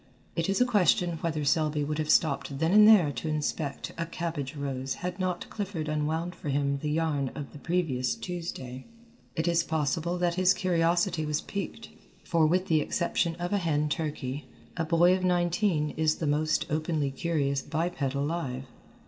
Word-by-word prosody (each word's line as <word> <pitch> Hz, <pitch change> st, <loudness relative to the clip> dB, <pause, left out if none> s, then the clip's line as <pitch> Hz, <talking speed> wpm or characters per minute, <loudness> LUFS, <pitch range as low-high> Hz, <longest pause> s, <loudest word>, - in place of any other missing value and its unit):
It 165 Hz, +2 st, 0 dB
is 195 Hz, -, +1 dB
a 250 Hz, -, +5 dB
question 180 Hz, -7 st, +2 dB
whether 155 Hz, -3 st, -2 dB
Selby 150 Hz, 0 st, +2 dB
would 150 Hz, +1 st, -2 dB
have 155 Hz, 0 st, -2 dB
stopped 140 Hz, -3 st, +2 dB
then 160 Hz, +3 st, +1 dB
and 210 Hz, 0 st, +8 dB
there 190 Hz, -9 st, +7 dB
to 155 Hz, -, -5 dB
inspect 150 Hz, -2 st, -2 dB
a 165 Hz, -, -1 dB
cabbage 160 Hz, -5 st, -4 dB
rose 135 Hz, -2 st, -3 dB
had 180 Hz, +1 st, -3 dB
not 180 Hz, -1 st, -2 dB
Clifford 195 Hz, -7 st, -4 dB
unwound 155 Hz, +3 st, -1 dB
for 150 Hz, -, -6 dB
him 140 Hz, 0 st, 0 dB
the 150 Hz, -, -3 dB
yarn 150 Hz, -3 st, 0 dB
of 145 Hz, -2 st, -6 dB
the 150 Hz, -, -10 dB
previous 155 Hz, -7 st, 0 dB
Tuesday. 150 Hz, -8 st, -6 dB, 0.5 s
It 160 Hz, +1 st, -1 dB
is 170 Hz, -1 st, +3 dB
possible 160 Hz, +2 st, -1 dB
that 175 Hz, -1 st, +1 dB
his 185 Hz, +1 st, +4 dB
curiosity 175 Hz, -2 st, +1 dB
was 150 Hz, -1 st, -1 dB
piqued, 200 Hz, +3 st, -5 dB, 0.3 s
for 165 Hz, -3 st, +3 dB
with 180 Hz, +3 st, +2 dB
the 155 Hz, -2 st, +3 dB
exception 170 Hz, +1 st, 0 dB
of 175 Hz, +2 st, -3 dB
a 200 Hz, -, +3 dB
hen 150 Hz, -4 st, 0 dB
turkey, 145 Hz, -3 st, -3 dB, 0.3 s
a 165 Hz, -, -1 dB
boy 170 Hz, +3 st, +4 dB
of 185 Hz, -, -3 dB
nineteen 175 Hz, -3 st, +1 dB
is 155 Hz, -1 st, +1 dB
the 160 Hz, -, -3 dB
most 150 Hz, +1 st, +1 dB
openly 155 Hz, -2 st, 0 dB
curious 140 Hz, -2 st, 0 dB
biped 170 Hz, +2 st, -2 dB
alive. 140 Hz, -1 st, -1 dB
160 Hz, 175 wpm, -28 LUFS, 145-175 Hz, 0.5 s, and